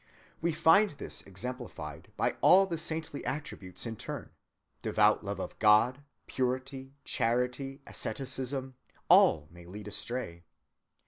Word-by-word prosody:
We 170 Hz, +1 st, +2 dB
find 165 Hz, +6 st, +5 dB
this 145 Hz, -, -8 dB
exemplified 120 Hz, +6 st, -7 dB
by -, -, +1 dB
all 195 Hz, +1 st, +7 dB
the 170 Hz, -4 st, -3 dB
saintly 160 Hz, -2 st, -4 dB
attributes 125 Hz, -11 st, -5 dB
in 115 Hz, -2 st, -5 dB
turn—devout -, -, -1 dB
love -, -, -4 dB
of -, -, -6 dB
God, 110 Hz, +5 st, +5 dB, 0.2 s
purity, 130 Hz, +1 st, -3 dB
charity, 125 Hz, +4 st, -1 dB
asceticism, 130 Hz, +2 st, -4 dB, 0.4 s
all 75 Hz, -1 st, +6 dB
may 85 Hz, 0 st, -13 dB
lead 105 Hz, +3 st, -8 dB
astray. 105 Hz, -5 st, -4 dB
130 Hz, 115 wpm, -31 LUFS, 110-140 Hz, 0.4 s, all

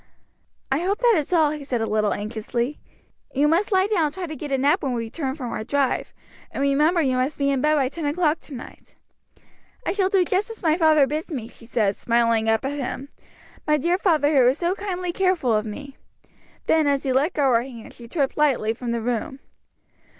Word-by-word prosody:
"I 270 Hz, -, +2 dB
hope 385 Hz, +4 st, 0 dB
that 485 Hz, -2 st, +4 dB
is 310 Hz, 0 st, -1 dB
all," 315 Hz, -4 st, +4 dB
he 300 Hz, -1 st, -6 dB
said 255 Hz, -4 st, -2 dB
a 225 Hz, -, 0 dB
little 215 Hz, -1 st, +1 dB
anxiously. 235 Hz, +5 st, -3 dB, 0.6 s
"You 285 Hz, +3 st, +3 dB
must 345 Hz, +8 st, +1 dB
lie 380 Hz, -1 st, +4 dB
down 400 Hz, -6 st, +1 dB
and 295 Hz, -, -1 dB
try 375 Hz, -1 st, -4 dB
to 310 Hz, -2 st, -6 dB
get 295 Hz, -1 st, -7 dB
a 270 Hz, -, +2 dB
nap 290 Hz, +8 st, +2 dB
when 265 Hz, -3 st, -1 dB
we 235 Hz, -1 st, -2 dB
return 265 Hz, +3 st, -4 dB
from 255 Hz, -6 st, -5 dB
our 215 Hz, -, -3 dB
drive; 275 Hz, +2 st, 0 dB, 0.4 s
and -, -, -7 dB
remember 300 Hz, +5 st, +3 dB
you 260 Hz, -2 st, +1 dB
must 260 Hz, +4 st, -1 dB
be 280 Hz, -1 st, +1 dB
in 270 Hz, -2 st, 0 dB
bed 305 Hz, +2 st, +3 dB
by 275 Hz, -3 st, +2 dB
ten 310 Hz, +4 st, -5 dB
o'clock 310 Hz, +1 st, +1 dB
to 285 Hz, -, -10 dB
night." 240 Hz, -, -12 dB, 0.9 s
"I -, -, 0 dB
shall 390 Hz, -2 st, +1 dB
do 385 Hz, -2 st, +3 dB
just 385 Hz, +5 st, 0 dB
as 450 Hz, -3 st, -8 dB
my 315 Hz, -2 st, +3 dB
father 315 Hz, -4 st, +5 dB
bids 305 Hz, +5 st, -4 dB
me," 245 Hz, -7 st, -4 dB
she 230 Hz, -, -15 dB
said, 215 Hz, -5 st, +1 dB
smiling 230 Hz, -1 st, +1 dB
up 225 Hz, +3 st, +1 dB
at 285 Hz, +2 st, -3 dB
him, 275 Hz, +1 st, -5 dB, 0.6 s
"my 300 Hz, 0 st, +4 dB
dear 345 Hz, +6 st, +1 dB
father 310 Hz, -6 st, +2 dB
who 255 Hz, -3 st, +6 dB
is 265 Hz, -, 0 dB
so 345 Hz, +1 st, 0 dB
kindly 365 Hz, -3 st, -3 dB
careful 365 Hz, -11 st, +1 dB
of 215 Hz, 0 st, 0 dB
me." 275 Hz, +6 st, -8 dB, 0.7 s
Then 315 Hz, -2 st, +3 dB
as 280 Hz, -1 st, +1 dB
he 265 Hz, -, 0 dB
let 290 Hz, +8 st, +2 dB
go 275 Hz, -4 st, +2 dB
her 230 Hz, -, +4 dB
hands, 240 Hz, -3 st, -10 dB
she 235 Hz, -, -11 dB
tripped 275 Hz, +1 st, -1 dB
lightly 265 Hz, -7 st, +2 dB
from 235 Hz, 0 st, -4 dB
the 235 Hz, -, -2 dB
room. 245 Hz, +4 st, -2 dB
285 Hz, 225 wpm, -23 LUFS, 245-330 Hz, 0.9 s, who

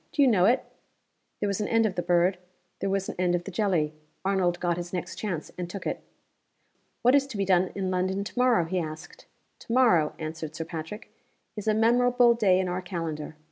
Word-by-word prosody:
Do 285 Hz, -, +3 dB
you -, -, +5 dB
know 195 Hz, -7 st, +4 dB
it?" 245 Hz, +5 st, +3 dB, 0.7 s
There 205 Hz, -, 0 dB
was 200 Hz, +1 st, -1 dB
an 210 Hz, -, -1 dB
end 225 Hz, -1 st, +3 dB
of 210 Hz, -, 0 dB
the 175 Hz, -, -2 dB
bird; 175 Hz, +1 st, +2 dB, 0.4 s
there 195 Hz, -, -1 dB
was 195 Hz, 0 st, -1 dB
an -, -, -4 dB
end 180 Hz, -1 st, +2 dB
of 175 Hz, -, -2 dB
the 195 Hz, -, -7 dB
jelly. 175 Hz, -6 st, 0 dB, 0.3 s
Arnold 185 Hz, -3 st, +1 dB
got 175 Hz, -1 st, 0 dB
his 175 Hz, 0 st, -5 dB
next 180 Hz, -2 st, -4 dB
chance 180 Hz, -8 st, -4 dB
and 175 Hz, -1 st, -4 dB
took 195 Hz, +2 st, -7 dB
it. -, -, -3 dB, 1.0 s
"What 250 Hz, +2 st, +5 dB
is 275 Hz, -1 st, +4 dB
to 250 Hz, -6 st, -7 dB
be 200 Hz, -, 0 dB
done 185 Hz, -1 st, +3 dB
in 190 Hz, -2 st, -2 dB
London 185 Hz, +2 st, 0 dB
to -, -, -8 dB
morrow?" 245 Hz, -8 st, +4 dB
he 185 Hz, +3 st, -1 dB
asked. 155 Hz, -1 st, -8 dB, 0.3 s
"To -, -, -9 dB
morrow," 225 Hz, -12 st, +4 dB
answered 155 Hz, -1 st, -6 dB
Sir 165 Hz, -, -4 dB
Patrick, 165 Hz, +6 st, -7 dB, 0.4 s
"is 210 Hz, -1 st, -6 dB
a 215 Hz, -, +3 dB
memorable 240 Hz, +2 st, +4 dB
day 200 Hz, -6 st, +3 dB
in 190 Hz, -, 0 dB
our 180 Hz, +1 st, -2 dB
calendar. 165 Hz, -4 st, -5 dB
185 Hz, 215 wpm, -27 LUFS, 175-215 Hz, 1.0 s, you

